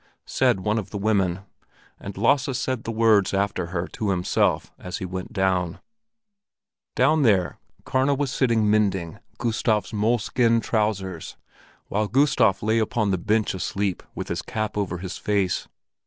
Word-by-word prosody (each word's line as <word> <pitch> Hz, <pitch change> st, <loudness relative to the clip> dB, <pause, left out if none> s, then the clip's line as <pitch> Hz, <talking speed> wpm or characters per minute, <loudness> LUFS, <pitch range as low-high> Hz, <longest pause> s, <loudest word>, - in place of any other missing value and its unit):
said 95 Hz, -, +1 dB
one 105 Hz, +3 st, 0 dB
of 105 Hz, -, -7 dB
the 105 Hz, -, -5 dB
women, 100 Hz, -3 st, +1 dB, 0.6 s
and 100 Hz, -1 st, -8 dB
Lasse 135 Hz, -2 st, +2 dB
said 130 Hz, -3 st, -2 dB
the 115 Hz, -, -2 dB
words 110 Hz, -4 st, +3 dB
after 100 Hz, -3 st, -1 dB
her 85 Hz, 0 st, -3 dB
to 105 Hz, -, -3 dB
himself 90 Hz, -2 st, +1 dB
as 90 Hz, -, -5 dB
he -, -, -5 dB
went 95 Hz, 0 st, -6 dB
down. 95 Hz, -3 st, 0 dB, 1.2 s
Down 150 Hz, +5 st, +3 dB
there 100 Hz, -8 st, +2 dB, 0.3 s
Karna 135 Hz, +2 st, +2 dB
was 140 Hz, -1 st, -1 dB
sitting 115 Hz, -5 st, +2 dB
mending 95 Hz, -6 st, +1 dB, 0.2 s
Gustav's 110 Hz, -2 st, 0 dB
moleskin 115 Hz, +2 st, +2 dB
trousers, 105 Hz, -6 st, -2 dB, 0.5 s
while 105 Hz, +1 st, 0 dB
Gustav 120 Hz, -7 st, +3 dB
lay 110 Hz, +2 st, +2 dB
upon 110 Hz, -2 st, 0 dB
the 95 Hz, -, 0 dB
bench 110 Hz, +4 st, +1 dB
asleep 95 Hz, 0 st, -2 dB
with -, -, -5 dB
his -, -, -2 dB
cap 110 Hz, -1 st, -3 dB
over 100 Hz, -4 st, -2 dB
his 90 Hz, +1 st, -6 dB
face. 100 Hz, -4 st, 0 dB
105 Hz, 150 wpm, -24 LUFS, 95-115 Hz, 1.2 s, words